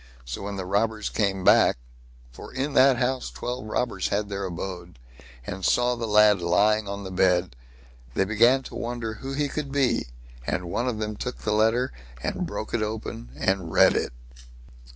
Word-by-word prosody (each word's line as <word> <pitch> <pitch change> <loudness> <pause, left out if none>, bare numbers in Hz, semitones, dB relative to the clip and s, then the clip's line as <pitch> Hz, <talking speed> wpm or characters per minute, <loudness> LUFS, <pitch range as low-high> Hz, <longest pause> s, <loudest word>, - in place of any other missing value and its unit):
So - - -5
when 100 +1 -4
the 95 -1 -4
robbers 105 +3 0
came 95 -3 0
back—for - - 0
in 135 +2 -2
that 130 -1 +6
house 130 +1 -1
twelve 125 -1 -5
robbers 110 -3 -1
had 105 0 -1
their 100 -1 -3
abode—and 80 -6 -8
saw 125 +5 +3
the 115 -1 -4
lad 105 -2 +5
lying 105 +5 +3
on 100 0 -5
the 95 - -6
bed, 90 -5 +2 0.6
they 95 - +2
began 120 +6 +4
to - - -10
wonder 115 -2 -3
who 135 +5 -6
he 145 +1 0
could 140 0 -4
be, 135 - +1 0.4
and 90 - -1
one 120 +7 -1
of 120 -3 -1
them 105 -1 -3
took 125 - -4
the 105 - -2
letter 115 +4 +2 0.3
and - - -2
broke 110 - -5
it 120 - +1
open, 105 - -4
and 95 -2 0
read - - +5
it. - - -1
105 Hz, 175 wpm, -25 LUFS, 90-120 Hz, 0.6 s, that